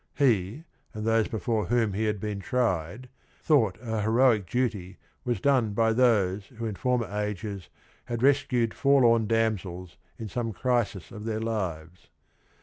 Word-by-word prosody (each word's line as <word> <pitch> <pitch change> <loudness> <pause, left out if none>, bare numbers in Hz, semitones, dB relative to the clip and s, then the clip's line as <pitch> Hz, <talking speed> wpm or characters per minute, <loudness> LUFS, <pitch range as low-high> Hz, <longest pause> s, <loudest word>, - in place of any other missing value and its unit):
He 120 - +1 0.3
and 105 0 -4
those 115 -1 +2
before 110 0 -1
whom 115 -4 +1
he 110 +3 -1
had 105 -1 -1
been 105 0 -4
tried 105 -1 -1 0.4
thought 115 - +3
a 110 -2 -2
heroic 110 -3 +3
duty 100 -6 -2 0.3
was 120 -5 -1
done 125 -4 +2
by 115 +1 +2
those 105 -5 +2
who 115 -2 -7
in 110 - -2
former 125 +2 0
ages 105 -1 -4 0.4
had 120 0 -4
rescued 130 -4 +2
forlorn 120 -5 +4
damsels 100 -6 -1 0.2
in 110 - -6
some 115 +1 -3
crisis 120 -5 -1
of 105 -2 -8
their 110 -1 -2
lives. 90 -7 -4
110 Hz, 145 wpm, -27 LUFS, 100-120 Hz, 0.4 s, forlorn